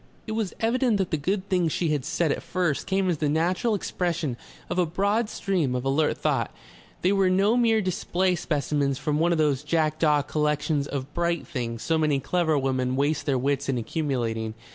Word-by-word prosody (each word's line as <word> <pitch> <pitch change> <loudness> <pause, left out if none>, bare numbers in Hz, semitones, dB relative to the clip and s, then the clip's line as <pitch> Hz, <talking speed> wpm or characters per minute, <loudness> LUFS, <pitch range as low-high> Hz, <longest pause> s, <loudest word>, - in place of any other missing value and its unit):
It 220 - -5
was 220 -3 -2
evident 235 0 +2
that 190 -3 -1
the - - +2
good 185 +6 -2
things 180 -4 +1
she 170 +1 0
had 150 -3 0
said 160 0 0
at - - -2
first 175 -6 -1
came 190 0 +1
as 170 -5 0
the 150 - +1
natural 180 +8 +1
expression 170 -8 -2 0.3
of - - -2
a 180 - +4
broad 205 +6 0
stream 170 -10 -1
of 125 +1 -3
alert 145 +3 +1
thought; - - 0 0.5
they 185 - +4
were 195 -2 +3
no 195 +5 +3
mere 230 -3 +3
display 185 0 0
specimens 145 -4 -1
from 150 +1 -1
one 170 +2 +3
of 170 - +2
those 145 -4 +2
jackdaw 155 -1 +2
collections 150 -1 0
of 140 +1 -5
bright 170 0 0
things 120 -7 -4
so 160 -1 +1
many 150 -3 +2
clever 160 +2 +1
women 130 -2 0
waste 145 +2 0
their 135 -2 +2
wits 140 +2 -1
in 130 - +1
accumulating. 115 -4 -2
155 Hz, 195 wpm, -26 LUFS, 140-185 Hz, 0.5 s, a